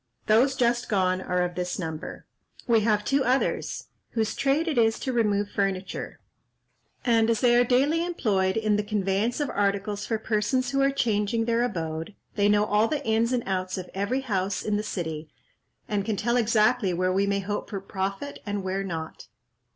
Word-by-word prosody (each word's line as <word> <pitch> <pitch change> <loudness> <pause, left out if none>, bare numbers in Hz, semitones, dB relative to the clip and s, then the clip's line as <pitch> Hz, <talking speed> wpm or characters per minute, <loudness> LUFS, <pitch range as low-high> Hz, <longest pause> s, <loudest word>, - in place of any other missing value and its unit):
Those 250 +5 +4
just 240 -1 +1
gone 185 -3 +1
are 180 -1 0
of 175 0 -2
this 180 0 -3
number. 160 -3 -6 0.4
We 230 -2 +4
have 210 -1 +1
two 275 0 +2
others, 255 +2 0 0.2
whose 220 -2 0
trade 285 +5 +1
it 295 -7 +1
is 225 -1 +3
to 260 - -3
remove 205 -3 +1
furniture; 195 -1 -2 0.9
and 230 -2 +3
as 225 -2 +1
they 240 -2 +5
are 245 - +6
daily 275 +7 +2
employed 205 - 0
in 215 -2 +2
the 210 - 0
conveyance 205 +3 0
of 290 -2 -1
articles 200 0 -1
for 225 - 0
persons 220 +5 0
who 275 0 +1
are 275 - +4
changing 225 -4 0
their 235 0 +1
abode, 165 -4 -3 0.2
they 205 -1 +2
know 210 0 +4
all 210 +2 +3
the 290 0 -3
ins 225 +2 +2
and 245 -2 0
outs 185 -1 -2
of 185 -1 -7
every 205 +7 -1
house 195 -6 -1
in 210 - 0
the 205 - 0
city, 160 -7 -4 0.6
and 205 -3 -1
can 215 +1 -1
tell 235 +4 0
exactly 220 -3 +2
where 185 +1 +1
we 200 +1 +2
may 200 0 +1
hope 205 +2 -4
for 200 - -3
profit 195 +7 -4
and 205 -2 -3
where 190 +1 -2
not." 165 -4 -6
210 Hz, 190 wpm, -26 LUFS, 195-240 Hz, 0.9 s, are